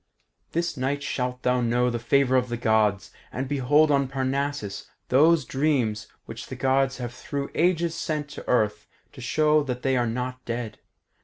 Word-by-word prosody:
This 170 -2 -1
night 140 +2 -1
shalt 125 -2 -3
thou 125 0 +2
know 120 +1 +1
the 120 - -2
favour 130 +2 +2
of 125 -1 +2
the 120 - -2
Gods, 110 -4 +1 0.2
and 130 +1 -3
behold 145 +3 +3
on 140 -1 +2
Parnassus 135 -4 -3 0.2
those 150 +2 +4
dreams 125 -7 0 0.2
which - - -8
the - - -6
Gods 135 0 +1
have 120 -1 -5
through 140 +1 -5
ages 170 0 +1
sent 155 -3 -3
to - - -10
Earth 105 -3 +1 0.3
to 130 - -11
show 150 +4 +3
that 125 -3 -4
they 135 -1 +2
are 120 -1 +1
not 125 +2 -4
dead. 115 -2 -5
130 Hz, 170 wpm, -25 LUFS, 120-145 Hz, 0.3 s, those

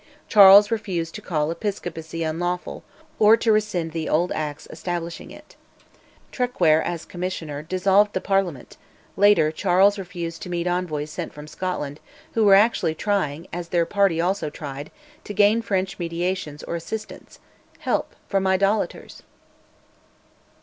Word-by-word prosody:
Charles 200 +1 +8
refused 185 -7 -2
to 215 - -7
call 155 -5 -1
Episcopacy 165 -3 -4
unlawful, 175 +3 -3 0.4
or 215 +1 +7
to 225 - +1
rescind 210 -6 0
the 160 0 -3
old 170 +4 +1
Acts 150 -1 -4
establishing 170 -1 -5
it. - - -15 0.8
Traquair, 180 - +2
as 170 -1 -4
Commissioner, 175 -5 -5
dissolved 195 +5 +2
the - - 0
Parliament; 195 -9 -2 0.4
later 195 -6 +4
Charles 195 +4 +3
refused 170 -3 -6
to - - -7
meet 175 -1 -2
envoys 170 -4 -2
sent 170 0 -6
from 150 0 -9
Scotland, 155 -4 -4 0.3
who 225 - +2
were 200 -2 +7
actually 200 -6 +3
trying, 170 -6 -1
as 175 0 -5
their 170 -1 +1
party 195 -2 +1
also 180 -2 0
tried, 145 -1 -7 0.3
to 205 - -7
gain 210 +3 +4
French 195 -3 -2
mediation 170 -2 -3
or - - -3
assistance, 215 +6 -7 0.4
help - - -1
from 195 -1 0
"idolaters"! 195 +3 0
180 Hz, 135 wpm, -23 LUFS, 165-200 Hz, 0.8 s, Charles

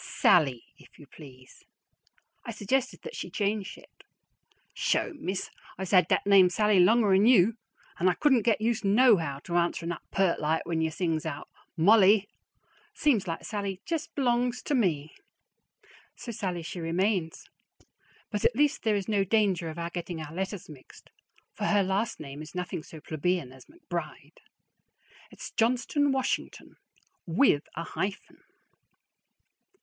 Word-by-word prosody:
SALLIE, 135 -9 +2 0.2
if - - -19
you 145 - -14
please. 130 -3 -15 0.8
I - - -9
suggested 240 +5 -2
that 475 - -8
she - - -6
change 205 -1 -2
it. - - -19 0.7
"Sho, - - 0
Miss, 190 -7 -4 0.3
I's 190 -1 -5
had 185 -2 +5
dat - - +1
name 195 -2 +6
Sallie 210 +1 +2
longer'n 205 +1 +4
you, 225 -3 +5 0.5
an' 185 - +3
I 180 - 0
couldn't 265 -6 +3
get 225 0 +1
used 225 0 0
nohow 200 - +3
to 175 - -2
answerin' 170 0 -1
up 170 - -6
pert 195 -3 +1
like 155 +1 -1
when 165 -1 -1
you 160 - +1
sings 160 -1 -2
out 150 -2 -6 0.3
`Mollie!' 200 +3 +5 0.7
Seems 235 -10 +1
like 165 - -4
Sallie 200 -3 -4
jest 325 -2 -4
b'longs 245 -2 0
to - - -2
me." 160 - 0 1.0
So 235 - -7
"Sallie" 185 -6 -4
she 175 +2 -7
remains; 170 +1 -1 0.9
but 210 - -3
at 240 - +3
least 290 +2 +2
there 220 -2 +1
is 200 -2 -3
no 205 -3 +1
danger 195 -4 +1
of 160 - -8
our 170 0 -4
getting 175 -1 -5
our 155 0 -8
letters 190 +1 -4
mixed, 145 -4 -15 0.4
for - - -4
her 205 -1 +3
last 195 +4 -1
name 140 0 -8
is 155 +3 -11
nothing 180 -1 -4
so 160 0 -12
plebeian 155 -2 -2
as 130 - -15
McBride. 170 - -8 0.9
It's - - -9
Johnston 255 +5 +1
Washington, 265 -1 -3 0.5
with 170 - +3
a 170 - -4
hyphen. 195 +3 -5
190 Hz, 150 wpm, -28 LUFS, 165-220 Hz, 1.0 s, name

